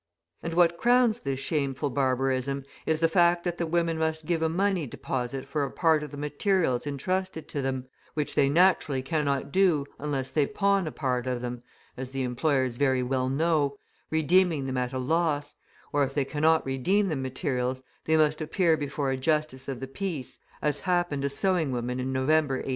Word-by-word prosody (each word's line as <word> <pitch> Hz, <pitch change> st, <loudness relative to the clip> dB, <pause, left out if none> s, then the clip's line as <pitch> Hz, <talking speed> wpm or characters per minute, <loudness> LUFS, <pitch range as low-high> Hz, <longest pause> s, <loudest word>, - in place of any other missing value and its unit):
And 165 Hz, 0 st, -4 dB
what 170 Hz, -1 st, +4 dB
crowns 240 Hz, -1 st, +4 dB
this 135 Hz, -, -3 dB
shameful 140 Hz, -1 st, -1 dB
barbarism 135 Hz, 0 st, 0 dB, 0.2 s
is 160 Hz, 0 st, +1 dB
the 165 Hz, -, +5 dB
fact 170 Hz, +1 st, +3 dB
that 175 Hz, -1 st, -3 dB
the 170 Hz, -, 0 dB
women 165 Hz, -1 st, 0 dB
must 160 Hz, 0 st, -1 dB
give 165 Hz, 0 st, 0 dB
a 160 Hz, -, +2 dB
money 185 Hz, -2 st, 0 dB
deposit 130 Hz, +1 st, -4 dB
for 150 Hz, -2 st, -1 dB
a 140 Hz, -, -2 dB
part 160 Hz, -3 st, +2 dB
of 150 Hz, -, -6 dB
the 145 Hz, -, -9 dB
materials 150 Hz, -2 st, 0 dB
entrusted 185 Hz, +4 st, -2 dB
to 145 Hz, -, -2 dB
them, 130 Hz, -1 st, -3 dB, 0.3 s
which 150 Hz, -2 st, -1 dB
they 140 Hz, -1 st, +3 dB
naturally 155 Hz, -5 st, +3 dB
cannot 140 Hz, -1 st, -1 dB
do 175 Hz, -6 st, +3 dB
unless 140 Hz, -3 st, -2 dB
they 150 Hz, -3 st, +2 dB
pawn 200 Hz, -3 st, +1 dB
a -, -, -3 dB
part 125 Hz, -3 st, -2 dB
of 125 Hz, -1 st, -2 dB
them 120 Hz, 0 st, -4 dB, 0.3 s
(as 130 Hz, 0 st, -6 dB
the 135 Hz, 0 st, -3 dB
employers 130 Hz, -1 st, 0 dB
very 130 Hz, -2 st, +2 dB
well 130 Hz, 0 st, 0 dB
know), 145 Hz, -1 st, +1 dB, 0.3 s
redeeming 160 Hz, -1 st, +2 dB
them 130 Hz, -1 st, -2 dB
at 125 Hz, -1 st, -1 dB
a 130 Hz, -, -3 dB
loss; 145 Hz, +1 st, 0 dB, 0.4 s
or 145 Hz, 0 st, +3 dB
if 135 Hz, 0 st, -3 dB
they 140 Hz, -2 st, +1 dB
cannot 155 Hz, +3 st, +2 dB
redeem 180 Hz, +11 st, +1 dB
the 155 Hz, -, -1 dB
materials, 130 Hz, -1 st, -2 dB, 0.2 s
they 160 Hz, 0 st, +3 dB
must 155 Hz, 0 st, +2 dB
appear 165 Hz, +1 st, +2 dB
before 145 Hz, -2 st, -2 dB
a 130 Hz, -, -1 dB
Justice 150 Hz, -1 st, -1 dB
of 135 Hz, -3 st, -4 dB
the 135 Hz, -, -5 dB
Peace, 155 Hz, -2 st, -5 dB, 0.2 s
as 150 Hz, -1 st, +1 dB
happened 175 Hz, -6 st, 0 dB
a 140 Hz, -, +1 dB
sewing 165 Hz, 0 st, 0 dB
woman 125 Hz, +1 st, -2 dB
in 130 Hz, +1 st, -2 dB
November, 135 Hz, +2 st, +2 dB
1843. 130 Hz, -, -4 dB
145 Hz, 190 wpm, -27 LUFS, 130-165 Hz, 0.4 s, the